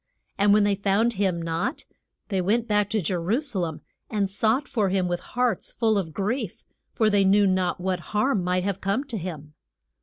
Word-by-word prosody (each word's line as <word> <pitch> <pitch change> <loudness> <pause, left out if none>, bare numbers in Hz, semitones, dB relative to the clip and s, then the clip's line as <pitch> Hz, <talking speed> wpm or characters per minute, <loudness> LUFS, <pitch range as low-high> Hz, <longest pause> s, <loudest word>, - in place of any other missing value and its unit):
] - - -48
And 200 0 +4
when 210 0 +5
they 205 0 +3
found 200 +4 +1
him 190 -4 0
not, 170 - -2 0.4
they 190 -3 0
went 225 +6 +1
back 210 -1 +2
to 215 -1 0
Je 180 +3 -1
ru 180 +8 0
sa 275 -10 -3
lem, 165 -3 -3 0.3
and 200 -3 -1
sought 225 +8 +1
for 210 -5 0
him 185 -1 +1
with 175 0 -1
hearts 245 -1 -1
full 220 -2 +1
of 185 -5 -1
grief, 210 - -3 0.3
for 220 -3 +2
they 200 -1 +4
knew 200 +2 +5
not 185 -2 +1
what 185 0 -1 0.2
harm 215 -4 +2
might 180 0 0
have 195 0 -2
come 200 +8 0
to 255 -6 -5
him. 155 -4 -7
200 Hz, 210 wpm, -25 LUFS, 185-220 Hz, 0.4 s, when